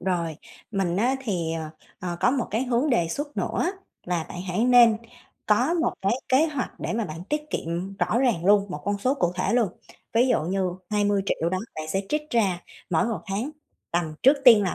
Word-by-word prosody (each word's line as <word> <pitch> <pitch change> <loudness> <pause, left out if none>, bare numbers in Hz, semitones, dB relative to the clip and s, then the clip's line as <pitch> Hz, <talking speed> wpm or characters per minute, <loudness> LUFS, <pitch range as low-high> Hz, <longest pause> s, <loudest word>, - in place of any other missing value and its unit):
rồi 170 -4 -1 0.3
mình 190 -4 0
á, 250 +6 +2
thì, 175 -8 -1
ờ, 160 -1 -4 0.3
ờ, 175 -3 -3
có - - +4
một 260 -2 0
cái 225 +5 0
hướng 250 +4 +1
đề 175 -10 +2
xuất 290 - -4
nữa 360 - 0 0.3
là 175 -3 -1
bạn 180 - -6
hãy 185 +6 +1
nên 240 -3 +7 0.5
có 245 +10 +3
một 335 - +1
cái 195 +3 +2 0.2
kế 275 +5 +4
hoạch 285 -5 -3
để - - -2
mà 225 0 -1
bạn 165 +1 -7
tiết 300 +7 -2
kiệm 175 +4 -3
rõ 225 - +1
ràng 240 -10 +1
luôn, 200 +1 +5
một 150 - -5
con 200 0 0
số 255 +6 +1
cụ 175 -10 0
thể 185 +5 0
luôn. 235 -4 +3 0.4
Ví 240 +3 +4
dụ 245 - +2
như 185 +2 0 0.2
20.000.000 205 -5 +1
đó, 185 - 0 0.2
bạn 155 0 -5
sẽ 190 +4 0
trích 300 0 -2
ra 195 -7 +1 0.3
mỗi 165 +3 +3
một 225 -8 -2
tháng 205 +8 -2 0.4
tầm 170 -3 -1
trước 275 +3 +6
tiên 230 -5 +9
là 185 - -1
205 Hz, 210 wpm, -25 LUFS, 175-245 Hz, 0.5 s, tiên